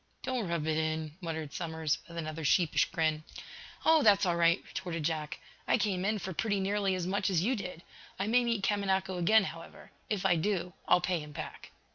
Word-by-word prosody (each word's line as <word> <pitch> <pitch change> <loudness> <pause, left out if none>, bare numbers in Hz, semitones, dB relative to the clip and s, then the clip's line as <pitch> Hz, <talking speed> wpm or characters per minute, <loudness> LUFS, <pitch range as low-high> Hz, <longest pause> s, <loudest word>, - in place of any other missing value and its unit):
"Don't 255 -6 -1
rub 170 -3 -1
it 155 0 0
in," 155 -1 -2
muttered 160 -4 -4
Somers, 160 -2 -1
with 170 -1 -10
another 155 0 -4
sheepish 165 +2 +3
grin. 155 -1 -1 0.6
"Oh, 320 -1 +6
that's 205 -5 +5
all 175 -2 +2
right," 170 +1 +4
retorted 165 -4 -4
Jack. 155 -1 -2 0.3
"I - - +4
came 195 -4 0
in 215 +1 +1
for 190 -1 -5
pretty 205 +3 0
nearly 195 0 +1
as 180 -2 -2
much 200 +2 0
as 175 -3 +2
you 255 +6 +2
did. 180 -5 -6 0.3
I 195 - -1
may 240 +3 +3
meet 230 -4 0
Kamanako 190 -2 0
again, 215 +5 +5
however. 165 -3 -9 0.2
If 200 -3 -1
I 175 -3 +4
do, 180 0 -1
I'll 180 - +5
pay 180 -1 0
him 150 -1 -9
back." 155 0 -7
180 Hz, 200 wpm, -31 LUFS, 160-200 Hz, 0.6 s, Oh